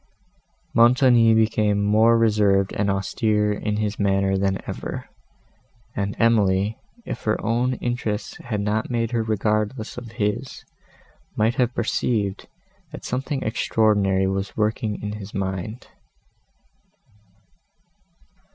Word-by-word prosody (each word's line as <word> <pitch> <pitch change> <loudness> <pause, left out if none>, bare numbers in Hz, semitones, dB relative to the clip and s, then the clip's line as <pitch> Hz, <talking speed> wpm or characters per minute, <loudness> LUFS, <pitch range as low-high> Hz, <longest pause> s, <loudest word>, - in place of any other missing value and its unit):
Montoni 120 -1 +5
became 110 -2 +2
more 110 +3 +4
reserved 105 -4 +2
and 100 0 0
austere 105 +2 0
in 105 0 -2
his 105 -1 -2
manner 95 -1 +2
than 95 0 +1
ever; - - -5 0.9
and 100 0 -2
Emily, 105 -2 +2 0.3
if - - -5
her 110 - +1
own 120 +3 +1
interests 120 -3 -3
had 105 -4 -4
not 105 +2 -1
made 115 -2 -1
her 120 -2 +1
regardless 110 +2 -1
of 115 -2 -11
his, 115 +4 -3 0.7
might 110 +2 +2
have 125 -1 0
perceived, 105 -3 -1 0.4
that - - -9
something 135 +2 -2
extraordinary 105 -4 +2
was 95 +1 -3
working 110 0 -1
in 105 - -3
his 100 0 -9
mind. 95 +4 -4
110 Hz, 115 wpm, -23 LUFS, 100-115 Hz, 0.9 s, Montoni